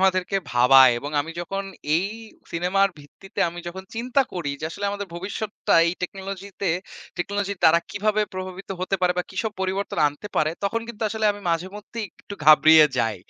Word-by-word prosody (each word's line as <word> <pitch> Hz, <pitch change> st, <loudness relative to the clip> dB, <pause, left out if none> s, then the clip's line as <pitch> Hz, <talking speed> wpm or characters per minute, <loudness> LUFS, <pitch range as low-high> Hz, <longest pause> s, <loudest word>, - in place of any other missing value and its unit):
আমাদেরকে 190 Hz, 0 st, +2 dB
ভাবায় 130 Hz, +2 st, +7 dB
এবং 145 Hz, +4 st, -6 dB
আমি 160 Hz, -, -5 dB
যখন 195 Hz, +3 st, -4 dB, 0.3 s
এই 185 Hz, +4 st, 0 dB, 0.5 s
সিনেমার 185 Hz, +4 st, +2 dB
ভিত্তিতে 150 Hz, +7 st, -9 dB
আমি 170 Hz, +1 st, -8 dB
যখন 190 Hz, +2 st, -8 dB
চিন্তা 245 Hz, +4 st, +1 dB
করি, 170 Hz, -6 st, -3 dB
যে 155 Hz, -, -4 dB
আসলে 200 Hz, +3 st, -6 dB
আমাদের 200 Hz, -1 st, -5 dB
ভবিষ্যৎটা 200 Hz, +4 st, -2 dB
এই 170 Hz, -, +1 dB
টেকনোলজিতে, 195 Hz, +1 st, -5 dB, 0.5 s
টেকনোলজির 200 Hz, +2 st, -2 dB
দ্বারা 165 Hz, +1 st, +6 dB
কিভাবে 215 Hz, +1 st, +1 dB
প্রভাবিত 185 Hz, +1 st, -6 dB
হতে 185 Hz, +1 st, -1 dB
পারে 180 Hz, -1 st, +3 dB
বা -, -, +2 dB
কিসব 215 Hz, +3 st, -2 dB
পরিবর্তন 190 Hz, 0 st, -2 dB
আনতে 145 Hz, +8 st, -9 dB
পারে? 155 Hz, 0 st, +3 dB
তখন 230 Hz, +3 st, 0 dB
কিন্তু 230 Hz, -1 st, -7 dB
আসলে 220 Hz, +1 st, -3 dB
আমি 205 Hz, -, -10 dB
মাঝেমধ্যেই 205 Hz, +6 st, -4 dB, 0.2 s
একটু 200 Hz, -, -8 dB
ঘাবড়িয়ে 155 Hz, +1 st, +8 dB
যাই। 110 Hz, -3 st, +1 dB
190 Hz, 165 wpm, -24 LUFS, 170-200 Hz, 0.5 s, ঘাবড়িয়ে